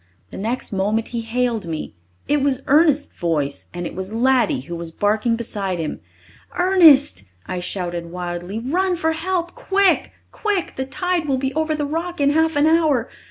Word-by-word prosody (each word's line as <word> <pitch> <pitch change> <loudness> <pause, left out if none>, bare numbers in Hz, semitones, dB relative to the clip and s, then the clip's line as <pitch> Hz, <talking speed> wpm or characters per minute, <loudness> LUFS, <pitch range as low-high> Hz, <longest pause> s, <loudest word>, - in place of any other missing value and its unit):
The - - -8
next 230 +5 -2
moment 210 +4 0
he 235 -1 -3
hailed 230 -3 -1
me. 160 -2 -5 0.3
It 295 0 +2
was 270 -1 0
Ernest's 295 0 +3
voice, 150 -5 -1
and 175 0 -5
it - - -5
was 190 +2 -6
Laddie 245 - +2
who 170 +6 -7
was 170 -1 -5
barking 215 +6 +1
beside 205 -5 -2
him. 160 -2 -4 0.6
"Ernest," 335 -6 +5 0.2
I 180 - -4
shouted 175 -2 -4
wildly, 175 +2 -5
"run 355 +10 0
for 320 -2 0
help 345 +1 -2
quick! 390 -1 +2 0.2
quick! 410 -5 -2
The 265 - -3
tide 345 +4 -1
will 270 -2 +1
be 265 +1 -2
over 315 0 0
the 295 -1 -2
rock 330 +4 -3
in 285 0 +3
half 320 +1 +2
an 290 +1 +3
hour! 315 -7 +3
260 Hz, 175 wpm, -21 LUFS, 190-320 Hz, 0.6 s, Ernest